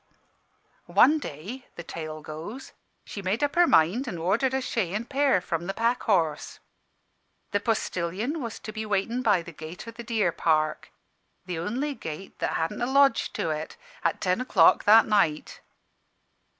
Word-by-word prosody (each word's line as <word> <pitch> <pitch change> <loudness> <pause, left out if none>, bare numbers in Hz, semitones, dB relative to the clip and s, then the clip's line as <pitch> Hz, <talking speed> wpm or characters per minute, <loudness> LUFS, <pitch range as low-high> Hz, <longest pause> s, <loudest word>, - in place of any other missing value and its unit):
"One 310 +3 +5
day 220 - -8
the 170 - -7
tale 155 -2 -7
goes 165 - -8 0.3
she 200 - -7
made 195 +8 -1
up 290 - +1
her 350 0 +5
mind 190 - +3
an' 190 -8 -4
ordered 220 +11 +1
a - - +1
shay 210 -8 -2
an' 220 +2 -2
pair 275 -4 +2
from 170 -1 -3
the 195 - -3
Pack 235 +2 +1
Horse. 165 -8 0 0.9
The 205 - +1
postillion 215 - -2
was 230 -3 -5
to 215 - -7
be 220 0 -4
waitin' 215 +4 -1
by 205 -8 +2
the 170 - -10
gate 160 +6 -9
o' - - -6
the 230 +1 -9
deer 220 -6 0
park 155 -2 0 0.5
the 175 -3 -4
only 255 - -2
gate 160 - -8
that - - -1
hadn't 165 +8 -2
a 240 - +1
lodge 275 -3 +4
to 160 - -1
it 155 +1 -5 0.3
at - - 0
ten 185 +5 +1
o'clock 190 -10 +4
that 220 +2 +7
night. 185 -8 0
205 Hz, 170 wpm, -26 LUFS, 165-240 Hz, 0.9 s, that